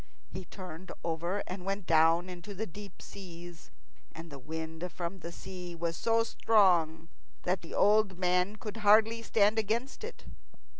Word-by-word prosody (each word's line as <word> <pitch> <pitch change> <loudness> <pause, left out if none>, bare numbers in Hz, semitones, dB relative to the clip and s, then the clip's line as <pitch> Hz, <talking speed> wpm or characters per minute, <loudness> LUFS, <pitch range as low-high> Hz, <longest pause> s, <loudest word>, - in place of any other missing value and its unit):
He 185 0 -6
turned 185 -2 -9
over 170 +4 -1
and 180 0 -6
went 195 0 -2
down 165 +2 +4
into 185 +2 -8
the 220 +4 -2
deep 200 0 -11
seas. 175 -3 -10 0.5
And 165 0 -9
the 140 - -8
wind 160 +4 -5
from 175 +2 -5
the 170 0 -7
sea 180 0 -8
was 165 0 -2
so 230 +3 +2
strong 175 -9 +3 0.4
that 180 +1 0
the 165 - -8
old 205 -2 +4
man 180 +2 +2
could 215 0 -7
hardly 220 +2 +5
stand 215 -1 +3
against 230 - -2
it. 460 - -8
185 Hz, 155 wpm, -31 LUFS, 170-205 Hz, 0.5 s, hardly